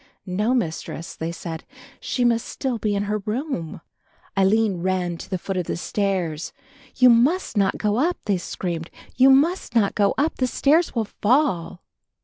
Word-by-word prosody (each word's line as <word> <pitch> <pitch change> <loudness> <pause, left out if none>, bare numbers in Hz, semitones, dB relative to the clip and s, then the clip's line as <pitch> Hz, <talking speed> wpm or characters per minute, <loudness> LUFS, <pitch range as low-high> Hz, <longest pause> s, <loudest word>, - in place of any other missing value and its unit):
"No, 210 +7 0
Mistress," 165 -5 -3
they 165 +1 -4
said, 165 -1 -6 0.4
"she 250 - -1
must 230 -1 +2
still 255 -4 -3
be 210 -2 0
in 200 - 0
her 210 +1 -1
room." 210 - -4 0.5
Aline 200 0 +3
ran 180 -1 -1
to - - -10
the 185 - -1
foot 190 +2 -4
of 180 - -2
the - - -2
stairs. 180 -5 -2 0.4
"You 255 - +6
must 250 +8 +3
not 200 -2 +2
go 210 0 0
up," 335 +7 +1
they 200 -3 +1
screamed, 170 -2 -4 0.3
"you 260 +1 +6
must 285 0 +3
not 205 -4 +3
go 200 -1 +2
up, 295 +4 0
the 255 - +1
stairs 305 +6 +2
will 225 -2 +1
fall." 205 - 0
210 Hz, 170 wpm, -23 LUFS, 180-250 Hz, 0.5 s, You